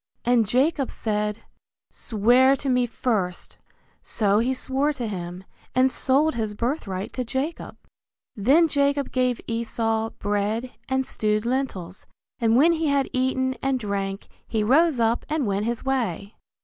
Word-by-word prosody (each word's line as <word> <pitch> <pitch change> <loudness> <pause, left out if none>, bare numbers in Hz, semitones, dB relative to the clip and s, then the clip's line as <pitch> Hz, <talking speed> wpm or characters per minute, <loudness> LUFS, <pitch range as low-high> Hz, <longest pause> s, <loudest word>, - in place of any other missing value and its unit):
And 235 -3 +3
Jacob 270 +4 +1
said, 210 0 -2 0.5
Swear 245 +5 +3
to 275 0 -4
me 250 -1 +2
first; 210 -7 -2 0.4
so 205 -1 +1
he 240 +3 +1
swore 270 +3 0
to 250 -4 -4
him, 180 -3 -5 0.3
and 260 +1 +4
sold 280 +5 +2
his 220 -3 -3
birthright 205 -6 -3
to 255 - -2
Jacob. 265 +7 -4 0.6
Then 275 +11 +4
Jacob 280 -2 +1
gave 255 -2 0
Esau 225 -1 -1
bread 205 +4 -1 0.2
and 265 0 +1
stewed 215 -1 -1
lentils, 235 -9 -3 0.3
and 230 -1 +3
when 305 +7 +6
he 325 -1 0
had 280 -2 +1
eaten 260 0 +1
and 270 -1 0
drank, 200 -2 -3 0.2
he 220 -2 0
rose 285 +4 +3
up 230 +1 +1
and 305 -3 0
went 200 0 -1
his 235 +1 -3
way. 225 -7 -2
240 Hz, 145 wpm, -24 LUFS, 210-265 Hz, 0.6 s, when